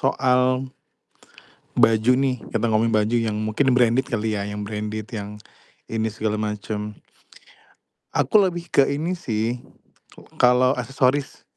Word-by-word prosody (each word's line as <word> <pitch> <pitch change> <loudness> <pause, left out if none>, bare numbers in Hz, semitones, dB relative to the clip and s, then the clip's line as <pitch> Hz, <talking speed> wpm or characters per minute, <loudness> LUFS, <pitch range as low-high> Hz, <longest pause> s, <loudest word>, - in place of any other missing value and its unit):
soal, 130 0 +1 1.1
baju 110 +2 +4
nih, 130 -4 0
kita 115 0 -1
ngomongin 110 +1 +2
baju 110 +2 +2
yang 110 -2 0
mungkin 110 +5 +1
branded 125 +1 +3
kali 110 -1 -1
ya, 100 - -2
yang 105 0 -5
branded 105 0 -4
yang 105 -1 -6 0.5
ini 110 0 -1
segala 110 0 -2
macem 105 0 -4 1.2
aku - - +2
lebih 175 -2 -5
ke 140 - +5
ini 160 +6 -2
sih, 115 -2 -2 0.8
kalau 125 +2 +4
aksesoris, 135 +2 0
115 Hz, 125 wpm, -23 LUFS, 105-130 Hz, 1.2 s, ke